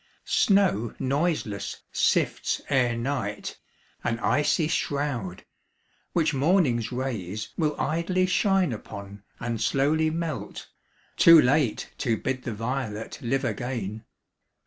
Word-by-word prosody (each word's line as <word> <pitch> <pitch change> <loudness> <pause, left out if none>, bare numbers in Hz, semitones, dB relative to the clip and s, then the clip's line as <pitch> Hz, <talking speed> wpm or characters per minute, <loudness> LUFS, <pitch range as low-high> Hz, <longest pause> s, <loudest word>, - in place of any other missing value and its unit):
Snow 190 - +2
noiseless 135 - -1
sifts - - +1
Ere 125 -3 +2
night, 115 -5 -3 0.4
an 115 -1 0
icy 150 +5 +2
shroud, 140 - -2 0.7
which 160 -3 +2
morning's 135 - +2
rays 110 -6 -3
Willidly 170 +3 0
shine 190 - +2
upon 100 -1 -9 0.2
and 115 -2 -3
slowly 150 +6 +2
melt, 165 -2 -4 0.5
Too 165 -1 +9
late 135 -3 +1
to 115 -4 +1
bid 130 +2 -2
the 120 - -2
violet 115 -1 -4
live 135 +2 0
again. 115 -4 -3
130 Hz, 100 wpm, -26 LUFS, 115-155 Hz, 0.7 s, Too